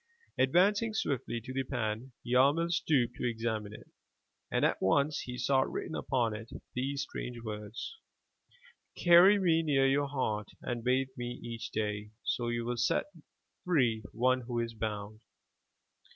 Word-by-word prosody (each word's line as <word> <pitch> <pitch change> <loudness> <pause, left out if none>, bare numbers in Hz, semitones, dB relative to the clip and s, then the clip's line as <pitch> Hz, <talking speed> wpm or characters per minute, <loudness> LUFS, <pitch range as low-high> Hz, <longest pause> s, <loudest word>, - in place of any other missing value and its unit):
Advancing 205 - +3
swiftly 130 - -1
to 125 +3 -8
the 135 0 0
pan, 120 -1 -3
Yarmil 140 +7 +3
stooped 130 -8 +2
to 125 - 0
examine 110 -2 -3
it, 105 - -11 0.6
and - - +2
at - - +1
once 140 +10 +2
he 125 0 -6
saw 135 +1 +3
written 160 - -3
upon 120 -8 0
it 110 +2 -8 0.2
these 135 +2 -1
strange 120 -1 -6
words: 105 - -6 1.0
"Carry 175 +4 +7
me 170 -4 +3
near 140 -4 +2
your 140 +1 +2
heart 110 -7 -2 0.2
and 120 -2 -3
bathe 130 +2 +2
me 120 0 -5
each 115 -1 -5
day, 105 -1 -2
so 120 - -1
you 120 0 -1
will 120 0 -2
set 195 - +1 0.5
free 125 -11 +2
one 130 +2 +2
who 120 0 -4
is 115 0 -2
bound." 110 -1 -4
125 Hz, 150 wpm, -31 LUFS, 115-140 Hz, 1.0 s, Carry